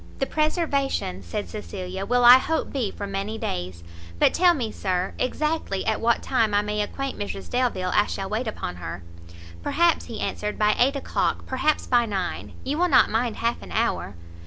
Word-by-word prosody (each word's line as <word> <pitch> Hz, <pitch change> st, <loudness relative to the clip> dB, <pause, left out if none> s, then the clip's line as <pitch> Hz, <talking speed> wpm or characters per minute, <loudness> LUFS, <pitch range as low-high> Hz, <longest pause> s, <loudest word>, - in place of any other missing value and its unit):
"The 270 Hz, -, 0 dB
preservation," 285 Hz, -, 0 dB
said 90 Hz, +2 st, -4 dB
Cecilia, 180 Hz, -, -6 dB
"will 245 Hz, 0 st, +3 dB
I 250 Hz, +2 st, +10 dB
hope 320 Hz, +4 st, -2 dB
be 250 Hz, -7 st, 0 dB
for 200 Hz, -, -6 dB
many 200 Hz, +2 st, -3 dB
days. 90 Hz, -, -4 dB, 0.3 s
But -, -, +4 dB
tell 355 Hz, -1 st, +5 dB
me, 235 Hz, -7 st, -2 dB
sir, 185 Hz, -2 st, -2 dB
exactly, 300 Hz, -6 st, -1 dB
at 220 Hz, -, 0 dB
what 235 Hz, +1 st, +2 dB
time 225 Hz, -5 st, +1 dB
I 205 Hz, -, +3 dB
may 210 Hz, 0 st, -1 dB
acquaint 270 Hz, +6 st, -4 dB
Mrs 200 Hz, -1 st, -5 dB
Delvile 235 Hz, -8 st, 0 dB
I 210 Hz, -, +4 dB
shall 195 Hz, -, -4 dB
wait 220 Hz, +5 st, -2 dB
upon 90 Hz, -, -4 dB
her?" 85 Hz, 0 st, -6 dB, 0.6 s
"Perhaps," 340 Hz, -, +2 dB
he 225 Hz, -3 st, -7 dB
answered, 210 Hz, 0 st, -3 dB
"by 210 Hz, 0 st, +3 dB
eight 270 Hz, +4 st, +4 dB
o'clock; 275 Hz, -, -1 dB
perhaps 290 Hz, +4 st, 0 dB
by 240 Hz, -2 st, +3 dB
nine; 195 Hz, -4 st, -3 dB
you 290 Hz, +4 st, -2 dB
will 360 Hz, 0 st, +3 dB
not -, -, +5 dB
mind 225 Hz, 0 st, 0 dB
half 235 Hz, +1 st, -1 dB
an -, -, -11 dB
hour?" 220 Hz, -, -1 dB
220 Hz, 185 wpm, -24 LUFS, 195-265 Hz, 0.6 s, I